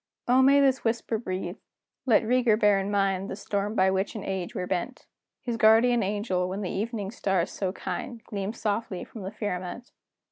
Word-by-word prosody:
Oh, 250 +2 +5
may 275 +2 +6
this 270 -1 +3
whisper 225 -1 -1
breathe 185 -3 -4 0.5
(let 225 -3 +5
Rieger 235 -2 +3
bear 205 -2 +4
in 195 +1 -2
mind 195 -1 0
The - - -4
storm 205 +1 -2
by 190 -2 +4
which 190 +4 -1
in 215 - -5
age 190 -2 -4
we're 180 - -2
bent!) 215 +9 -3 0.4
His 240 -2 -2
guardian 230 +2 +5
angel, 195 -3 -1
when 195 +2 -4
the 185 - -3
evening's 210 0 -3
star 190 -3 +1
so 190 -2 -3
kind 235 +4 -5
Gleams 205 +2 -5
softly 210 -3 -2
from 220 - -10
the 190 +1 -5
firmament! 205 +2 -5
205 Hz, 185 wpm, -27 LUFS, 190-230 Hz, 0.5 s, may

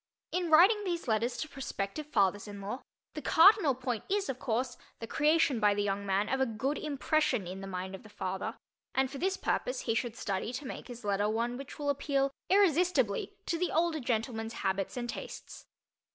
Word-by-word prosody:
In 355 -1 -1
writing 380 +7 +6
these 345 -6 -2
letters 230 +2 +1
to 310 - -3
prospective 270 -1 -4
fathers 205 -6 +2
in 205 -1 -8
law, 205 +7 -5 0.3
the - - -5
cardinal 330 - +6
point 250 -3 -3
is, 400 0 0
of 260 -1 -3
course, 245 +1 -1 0.2
the 230 - -6
creation 295 0 +3
by 205 -2 +4
the 205 - 0
young 200 0 -2
man 195 +2 +1
of 265 +3 0
a 265 - +3
good 255 +6 -2
impression 290 - +1
in 185 +2 -6
the 195 - -6
mind 185 0 -4
of 190 - -7
the 215 - -14
father, 190 -2 -4 0.4
and 265 0 +2
for 275 - -6
this 380 +2 0
purpose - - -1
he 225 - 0
should 235 0 -1
study 200 -1 -2
to 275 +3 -5
make - - -7
his 245 -3 -9
letter 205 +1 +1
one 235 +3 -1
which 270 +1 -8
will 290 -2 +1
appeal 275 -1 0 0.2
irresistibly 350 - +3
to 335 - -1
the 360 - 0
older 330 -1 +1
gentleman's 225 -2 -2
habits 195 +4 -2
and 240 -1 -2
tastes. - - -8
250 Hz, 200 wpm, -31 LUFS, 210-305 Hz, 0.4 s, writing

